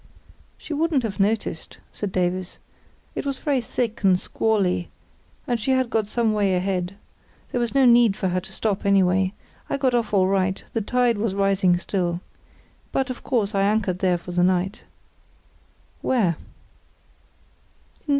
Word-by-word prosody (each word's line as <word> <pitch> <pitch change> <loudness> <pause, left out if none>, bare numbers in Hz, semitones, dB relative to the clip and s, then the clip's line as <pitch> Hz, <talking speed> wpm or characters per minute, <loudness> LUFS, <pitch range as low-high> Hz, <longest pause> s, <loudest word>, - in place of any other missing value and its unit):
"She - - -7
wouldn't 305 -3 +1
have 205 -4 -4
noticed," 205 -5 -1 0.2
said 205 -2 -4
Davies. 180 0 -1 0.6
"It - - -3
was 275 -2 -2
very 280 -5 0
thick 230 -1 -3
and 190 -3 +4
squally—and 210 +4 -2
she 225 - -3
had 260 -2 +1
got 220 -2 +1
some 225 0 +1
way 200 -3 +2
ahead. 180 0 -1 0.6
There 245 - 0
was 235 +2 -2
no 270 -1 +5
need 235 -4 +5
for 190 - 0
her 180 +1 0
to 190 - -11
stop, 200 0 -2
anyway. 190 -1 +3 0.4
I - - 0
got 260 -2 +1
off 235 -3 0
all 195 -3 +4
right; 190 0 0
the 225 - 0
tide 240 0 +1
was 210 -3 -1
rising 195 -2 +3
still. 175 -2 -2 0.7
But, 265 -1 0
of 250 - -7
course, 225 -5 0
I 195 - +1
anchored 200 -3 +1
there 185 -2 +2
for 175 +1 -9
the 175 0 +1
night." 185 +3 +1 1.2
"Where?" 210 -10 +2
200 Hz, 155 wpm, -23 LUFS, 185-235 Hz, 1.2 s, no